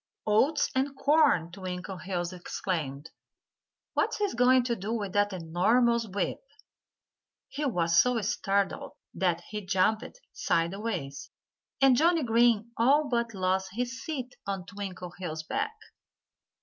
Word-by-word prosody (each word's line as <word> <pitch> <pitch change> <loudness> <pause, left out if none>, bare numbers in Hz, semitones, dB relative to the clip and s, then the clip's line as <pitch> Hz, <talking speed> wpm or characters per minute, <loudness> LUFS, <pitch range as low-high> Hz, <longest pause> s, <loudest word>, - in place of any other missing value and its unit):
"Oats 265 +9 +2
and 270 +2 0
corn!" 280 - +3
Twinkleheels 185 -1 -5
exclaimed. 165 -5 -4 0.8
"What's - - 0
he 415 -2 0
going 250 +1 +4
to 240 -1 -1
do 205 +1 -5
with 205 -5 -3
that 205 0 +2
enormous 225 +7 +2
whip?" 195 -1 -3 1.1
He 295 +2 -3
was 170 -9 +3
so 250 -1 +1
startled 200 0 -1 0.2
that 175 -1 0
he 210 -1 -5
jumped 190 - 0
sideways, 165 -6 -2 0.5
and 270 -2 +6
Johnnie 330 +3 +3
Green 235 -1 +3
all 280 +5 +3
but 235 -2 -1
lost 190 0 0
his 245 +3 -3
seat 260 -5 -5
on 195 -2 -3
Twinkleheels' 180 -4 -6
back. 440 - -2
205 Hz, 120 wpm, -28 LUFS, 180-245 Hz, 1.1 s, and